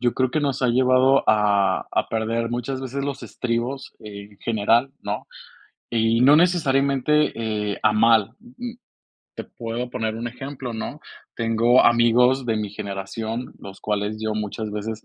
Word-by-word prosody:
yo 120 -1 +1
creo 130 -1 +1
que 155 - 0
nos 140 -2 -1
ha 125 - +3
llevado 130 +2 +4
a 105 -2 +2
a - - 0
perder 115 +1 -1
muchas 125 +2 -3
veces 135 +1 -4
los 140 -1 -4
estribos 125 +3 -3
en 100 -1 -11
general, 115 +3 +2
¿no? 105 +1 -4 0.7
Y 115 0 +2
no 140 +3 +7
necesariamente, 150 -3 +2 0.4
eh, - - -7
a 105 0 +4
mal. 110 -1 +4
Mm, 240 +3 -18 0.8
te - - -6
puedo 120 +1 -5
poner 110 -3 -2
un 115 +1 -4
ejemplo, 130 0 -7
¿no? 110 - -6 0.3
Tengo 115 +2 +3
amigos 120 +2 +4
de 110 -1 0
mi 105 -2 -3
generación, 105 +4 -5
los 100 -1 -11
cuales 105 0 -2
yo 110 -1 -2
muchas 105 0 -4
veces 110 +1 -5
115 Hz, 155 wpm, -23 LUFS, 110-130 Hz, 0.8 s, no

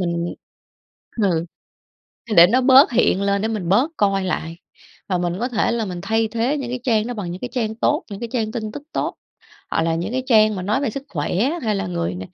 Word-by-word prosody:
mình 170 -1 -2 0.9
ừ, 170 -4 +1 0.9
để 170 - +10
nó 245 +8 +2
bớt 265 +1 +6
hiện 210 -5 +2
lên 200 0 +1
để 220 - 0
mình 205 -6 -3
bớt 245 - +3
coi 195 -2 +2
lại. 165 -2 -3 0.5
Và 185 -3 0
mình 175 -1 -1
có 245 - 0
thể 230 -1 0
là 235 -1 -1
mình 180 -3 -5
thay 225 +2 +1
thế 235 +6 0
những 255 -4 -4
cái 250 0 -4
trang 225 -3 +2
đó 245 - -4
bằng 195 -6 -5
những 180 - -8
cái 250 - -5
trang 220 -4 -1
tốt, - - 0
những 200 - -7
cái 235 - -4
trang 220 -4 -1
tin 215 -2 -4
tức 290 - -7
tốt, - - -2 0.6
hoặc - - +1
là 165 0 +1
những 175 +7 -3
cái 255 0 -1
trang 215 -3 +5
mà 185 - -4
nói 215 +8 0
về 275 - 0
sức 275 +5 -6
khỏe 150 -1 -3 0.3
hay 215 -2 0
là 195 -2 -2
người 170 - -2
n - - -7
215 Hz, 240 wpm, -21 LUFS, 180-240 Hz, 0.9 s, để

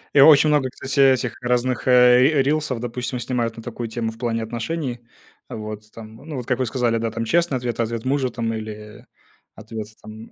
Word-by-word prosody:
И - - +6
очень 150 +1 +8
много, 145 -3 +2
кстати, 130 +2 -4
этих, 125 -2 -3
разных, 125 0 0
э, 125 +1 +6
р 140 -3 +3
рилсов, 145 -4 0
допустим, 125 +1 -4
снимают 120 -2 -2
на 115 - -10
такую 120 0 -5
тему, 115 0 -3
в 115 - -14
плане 115 -2 -2
отношений. 120 +3 -4 0.5
Вот, 105 0 -7
там, 110 -1 -11
ну, 150 +3 -9
вот, 125 -3 -5
как 125 0 -1
вы 130 - +1
сказали, 120 -1 0
да, 115 0 -2
там, 115 +1 -3
честный 170 +2 +1
ответ, 120 -1 -4
ответ 115 0 -2
мужа, 130 -1 0
там, 115 -2 -3
или 105 -1 -8 0.5
ответ, 110 -1 -7 0.2
там, 110 +1 -11
120 Hz, 200 wpm, -22 LUFS, 115-130 Hz, 0.5 s, очень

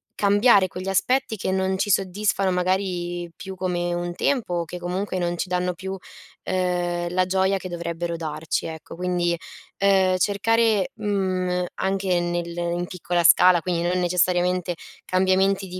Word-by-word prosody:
cambiare 205 -1 +4
quegli 185 +2 -6
aspetti 230 +4 +1
che 190 - -3
non 190 0 0
ci 200 +2 -1
soddisfano 195 0 +1
magari 180 -1 -1
più 190 -1 -7
come 175 -2 -2
un 175 0 -3
tempo, 240 -9 0
o 170 -1 -1
che 180 - -7
comunque 185 +2 -3
non 175 -1 -1
ci 185 - -2
danno 180 0 -1
più, 190 +2 -6
uhm 180 -2 -3
la 185 0 +2
gioia 190 +1 +1
che 185 -1 -7
dovrebbero 170 0 -4
darci 155 -1 -3
ecco. 160 0 -9
Quindi, 175 -1 0 0.4
ehm, 190 -2 +3
cercare, 210 +1 +2
uhm, 185 -4 -1
anche 190 -2 0
nel 175 0 -2
in 175 0 -1
piccola 175 -1 -1
scala, 180 +1 +6
quindi 175 0 -1
non 180 +1 +1
necessariamente 180 0 +1 0.3
cambiamenti 190 +1 +2
di 185 0 -7
180 Hz, 150 wpm, -23 LUFS, 175-190 Hz, 0.4 s, scala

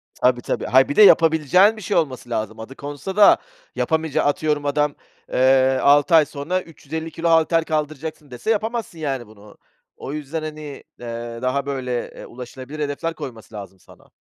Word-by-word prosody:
Tabii, 125 -1 +2
tabii, - - -3
hayır 130 +3 +4
bir 145 - -2
de - - +6
yapabileceğin 170 +3 +5
bir - - -9
şey 200 +2 -1
olması 130 -6 -2
lazım. 110 -1 -3
Adı 115 +4 -9
konsa 145 +7 -7
da 205 -1 +7 0.4
yapamayacağı 160 -1 0
atıyorum 145 0 0
adam, 145 0 0 0.4
eee, 130 0 +4
6 145 +4 +5
ay 155 -2 +6
sonra 155 +6 -3
350 160 0 -7
kilo 170 +2 -2
halter 165 0 +3
kaldıracaksın 155 -1 -4
dese 125 - -5
yapamazsın, 220 -4 -2
yani, 135 -6 -3
bunu. 105 -1 -17 0.4
O 135 - -7
yüzden, 150 +1 -5
hani, 155 0 -6 0.4
eee, 115 0 -6
daha 130 +2 -1
böyle, 130 -3 -3
eee, - - -11
ulaşılabilir 130 +4 -9
hedefler 150 +3 -2
koyması 125 -8 -9
lazım 100 -2 -9
sana. - - -20
145 Hz, 170 wpm, -21 LUFS, 130-160 Hz, 0.4 s, da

